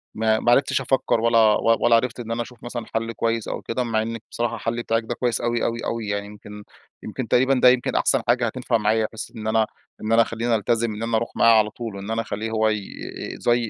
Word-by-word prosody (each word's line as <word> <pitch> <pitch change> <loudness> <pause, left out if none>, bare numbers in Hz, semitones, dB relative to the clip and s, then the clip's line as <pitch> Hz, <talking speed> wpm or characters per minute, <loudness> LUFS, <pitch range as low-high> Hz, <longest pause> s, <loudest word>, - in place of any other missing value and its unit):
ما 110 0 +2
ما 120 - +2
عرفتش 135 +1 +3
أفكر 130 -2 +1
ولا 115 0 +3
و 110 +1 +4
ولا 120 - +6
عرفت 120 +1 0
إن 115 -1 -6
أنا 115 - -1
أشوف 120 -1 -10
مثلًا 120 -2 -5
حل 115 0 -1
كويس 115 -1 -1
أو - - -4
كده. 125 +2 -2
مع 115 -2 0
إنِك 115 0 -5
بصراحة، 120 -1 -2
الحل 115 +2 -3
بتاعِك 115 0 0
ده 120 +2 -4
كويس 120 -1 -1
أوي 120 0 0
أوي 115 0 -1
أوي. 115 -2 -3
يعني 100 0 -2
يمكن 105 0 -11 0.4
يمكن 115 +3 -5
تقريبًا 130 +5 +3
ده 125 -1 +6
يمكن 125 0 +1
أحسن 135 - +2
حاجة 120 0 +3
هتنفع 120 +1 0
معايا، 110 +1 +1
بحيث 110 0 -7
إن 110 -1 -6
أنا 110 0 +3 0.4
إن 110 +1 -3
أنا 115 - +6
أخليني 115 0 0
ألتزم، 115 +1 0
إن 105 - -5
أنا 115 -1 +1
أروح 115 - -3
معاه 115 -1 +6
على 105 0 +1
طول، 110 -1 -7
وإن 100 +3 -6
أنا 115 - 0
أخليه 110 0 -4
هو 110 0 +2
ي 110 -1 0 0.6
زي 120 -1 +1
115 Hz, 240 wpm, -23 LUFS, 110-120 Hz, 0.6 s, ولا